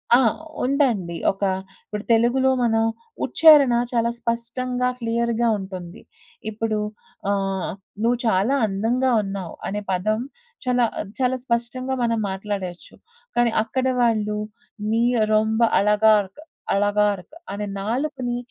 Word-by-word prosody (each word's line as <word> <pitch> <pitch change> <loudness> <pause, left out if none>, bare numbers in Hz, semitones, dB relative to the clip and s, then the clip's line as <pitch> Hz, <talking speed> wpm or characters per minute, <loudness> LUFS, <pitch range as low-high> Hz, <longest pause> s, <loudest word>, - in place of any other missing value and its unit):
ఆ! - - +7 0.5
ఉందండి. 250 - +1 0.2
ఒక 195 - -15 0.4
ఇప్పుడు 210 0 -5
తెలుగులో 240 +4 +3
మనం 225 -1 +2 0.4
ఉచ్చారణ 300 -6 +6 0.2
చాలా 235 -1 +1
స్పష్టంగా 245 +2 -1
క్లియర్‌గా 235 0 0
ఉంటుంది. 185 -3 -8 0.5
ఇప్పుడు 220 0 -2 0.5
ఆహ్, 195 -2 -1 0.3
'నువ్వు 235 +2 +2
చాలా 220 +5 +2
అందంగా 225 +6 0
ఉన్నావు' 195 -4 -5
అనే 205 +1 -3
పదం 215 +4 0 0.5
చాలా 250 -1 +3 0.3
చాలా 255 0 +1
స్పష్టంగా 255 +2 -1
మనం 230 -1 +1
మాట్లాడయేచ్చు. 190 -2 -5 0.4
కానీ 240 -1 +4
అక్కడ 255 +4 -2 0.2
వాళ్ళు 215 -3 +1 0.5
నీ 230 +1 +2 0.3
రొంబ 220 +1 +2 0.2
అలగార్క్, 210 0 +3 0.4
అలగార్క్ 205 - +1 0.2
అనే 210 0 -4
నాలుకని 250 +2 -2
225 Hz, 105 wpm, -23 LUFS, 205-245 Hz, 0.5 s, ఆ